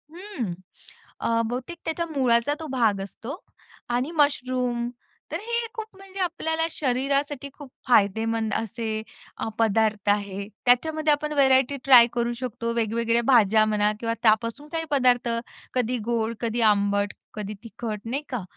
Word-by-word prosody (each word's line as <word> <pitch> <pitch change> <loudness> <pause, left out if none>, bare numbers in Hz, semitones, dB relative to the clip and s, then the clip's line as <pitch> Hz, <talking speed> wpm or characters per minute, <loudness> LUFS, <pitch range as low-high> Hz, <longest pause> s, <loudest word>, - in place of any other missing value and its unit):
हं. 345 - -5 0.7
अ, 230 0 +1
बहुतेक 250 +9 -4
त्याच्या 325 +1 -1
मुळाचा 245 0 +3
तो 320 - -6
भाग 220 -6 +2
असतो 235 - -8 0.5
आणि 250 +6 0
मशरूम 250 -5 +1 0.4
तर - - -2
हे 470 +1 -1
खूप 445 -2 -5
म्हणजे 390 0 -10
आपल्याला 325 -3 0
शरीरासाठी 280 +1 -1
खूप 290 -3 -12 0.2
फायदेमंद 220 0 +2
असे 220 0 -3 0.6
पदार्थ 215 -2 +2
आहे. 200 -1 -1 0.2
त्याच्यामध्ये 310 +5 +3
आपण 300 +1 -2
व्हरायटी 270 -1 +4
ट्राय 245 -3 +8
करू 240 0 0
शकतो 230 -1 -3
वेगवेगळ्या 230 +1 +1
भाज्या 220 -4 +5
म्हणा 210 -1 +2
किंवा 230 -1 -1
त्यापासून 230 +6 +2
काही 325 0 -2
पदार्थ 250 -3 +3 0.4
कधी 250 0 0
गोड, 230 -1 0
कधी 235 0 -1
आंबट, 205 -1 +2 0.2
कधी 210 -1 -5
तिखट 225 -2 -5
नाही 275 +4 -1
का. 250 -7 -3
240 Hz, 135 wpm, -25 LUFS, 220-280 Hz, 0.7 s, ट्राय